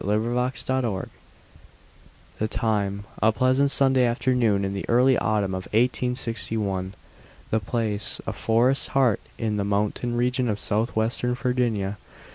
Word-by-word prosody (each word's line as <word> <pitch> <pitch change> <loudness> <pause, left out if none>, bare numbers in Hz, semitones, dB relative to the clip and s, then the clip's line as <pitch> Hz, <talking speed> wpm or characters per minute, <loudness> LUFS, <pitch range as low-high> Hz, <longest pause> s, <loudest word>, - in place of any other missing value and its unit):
THE 105 +2 +1
MOCKING 125 +3 -1 0.2
BIRD 105 -6 -3 1.3
The 110 - 0
time, 100 -3 -1 0.2
a 110 - +5
pleasant 130 +5 +2
Sunday 135 -2 +3
afternoon 120 -4 +2
in 95 - -2
the 100 - -5
early 125 +2 +5
autumn 105 -4 0
of 95 0 -4
1861. 110 -5 -1 0.6
The 110 - +2
place, 110 -1 -2
a - - -3
forest's 120 +4 +2
heart 125 -6 +3 0.2
in 110 -2 -1
the 100 - 0
mountain 105 +4 -1
region 125 0 +1
of 105 -1 -1
southwestern 115 +3 0
Virginia. 120 -5 -1
115 Hz, 130 wpm, -25 LUFS, 105-125 Hz, 1.3 s, a